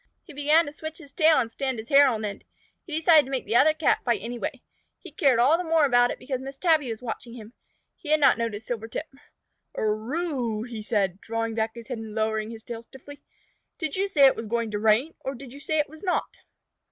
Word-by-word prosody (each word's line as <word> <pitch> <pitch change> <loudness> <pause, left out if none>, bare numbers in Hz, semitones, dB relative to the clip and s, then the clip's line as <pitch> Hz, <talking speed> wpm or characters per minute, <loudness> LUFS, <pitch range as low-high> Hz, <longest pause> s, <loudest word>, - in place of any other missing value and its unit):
He 335 - -13
began 300 +4 +3
to 290 - -8
switch 315 0 -7
his 285 -5 -14
tail 315 -2 +4
and 235 -4 0
stand 265 0 -3
his 220 +1 -8
hair 280 0 +7
on 220 -4 -1
end. 200 -1 -6 0.4
He 315 - -4
decided 315 -1 +5
to - - -10
make 265 -2 -2
the 220 - -2
other 305 +5 +5
Cat 310 0 +2
fight 235 -4 +1
anyway. 235 +3 -5 0.3
He 360 - -13
cared 275 -4 +3
all 275 +8 +4
the - - -2
more 325 -2 +3
about 245 -2 +4
it - - -4
because 260 -1 -4
Miss 270 +1 -8
Tabby 315 -6 +2
was 225 +1 -6
watching 235 0 -6
him. 225 -1 -11 0.4
He 305 - -10
had 310 0 +4
not 275 -3 +5
noticed 225 -2 -3
Silvertip. 230 +5 -4 0.7
"Er 215 +2 -1
oo!" 240 -9 -3
said 205 -3 0
he, 180 - -25
drawing 230 0 -3
back 220 0 -2
his 235 -1 -10
head 250 -4 -4
and 220 -1 -8
lowering 220 0 -1
his 225 -1 -9
tail 230 -1 -7
stiffly. 270 +4 -14 0.6
"Did 315 -4 -3
you 390 +1 0
say 295 -8 +5
it 265 - +6
was 225 0 -6
going 230 0 -1
to 205 - -2
rain, 220 +9 +2
or 270 +1 -5
did 255 0 -11
you 280 - -10
say 310 +2 -2
it 300 - +1
was 315 +2 -14
not?" 365 -3 -2
250 Hz, 240 wpm, -26 LUFS, 225-300 Hz, 0.7 s, hair